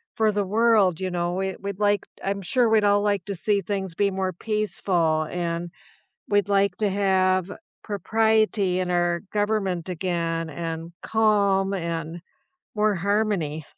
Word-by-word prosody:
for 220 -1 +2
the 205 -1 -1
world, 210 -4 +3
you 185 - -1
know? 175 0 -1
We, 190 0 -2
we'd 200 0 -5
like 205 -1 +2 0.2
I'm 200 0 -2
sure 240 +5 +2
we'd 220 -1 +4
all 205 0 +4
like 205 -3 0
to 200 - -4
see 200 +3 0
things 190 -2 -4
be 200 +2 +2
more 190 -1 -2
peaceful, 180 -5 0
and 170 -1 -3 0.6
we'd 205 -1 +2
like 200 -2 +2
to 210 -2 +1
have 190 -1 +1 0.3
propriety 215 -2 +1
in 180 -1 -1
our 175 -1 +1
government 205 -4 -1
again, 165 -2 -2
and 165 +1 -5
calm 200 -3 +2
and 170 -2 -4 0.5
more 210 -1 +2
harmony. 190 -5 0
195 Hz, 150 wpm, -24 LUFS, 175-205 Hz, 0.6 s, we'd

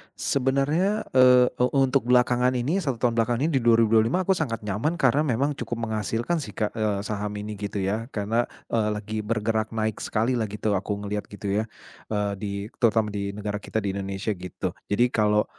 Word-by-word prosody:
Sebenarnya, 140 +10 +1
eee, 125 -1 +6
e 125 - -1
untuk 135 -2 +2
belakangan 125 0 +3
ini, 140 +10 0
1 140 -9 -1
tahun 120 -2 +1
belakangan 115 +2 +1
ini 165 - +1
di - - -6
2025, 115 +4 +4
aku 190 - +1
sangat 115 -8 -2
nyaman 105 - -1
karena 145 -1 +3
memang 140 +2 0
cukup 115 0 -4
menghasilkan 115 - -1
sih 150 - -7
Kak. 105 -2 -1
Eee, 105 -2 0
saham 105 -1 -3
ini, 105 0 -5
gitu 105 -1 -3
ya. 105 +4 -1
Karena 110 +3 0 0.3
eee, 110 -2 +1
lagi 105 +1 -5
bergerak 110 0 -1
naik 110 -1 -1
sekali 120 +3 0
lah 110 - -1
gitu. 105 +1 -2
Aku 100 +2 -3
ngelihat 105 0 -3
gitu, 100 -1 -5
ya. - - +1 0.5
Eee, 105 -1 0
di 105 -1 -4 0.3
terutama 110 -3 +3
di 100 -1 -3
negara 105 0 -3
kita, 110 +1 -3
di 100 - 0
Indonesia, 100 +2 -3
gitu. 90 -2 -5 0.2
Jadi 120 +4 +3
kalau, 105 -1 +3
110 Hz, 190 wpm, -25 LUFS, 105-125 Hz, 0.5 s, eee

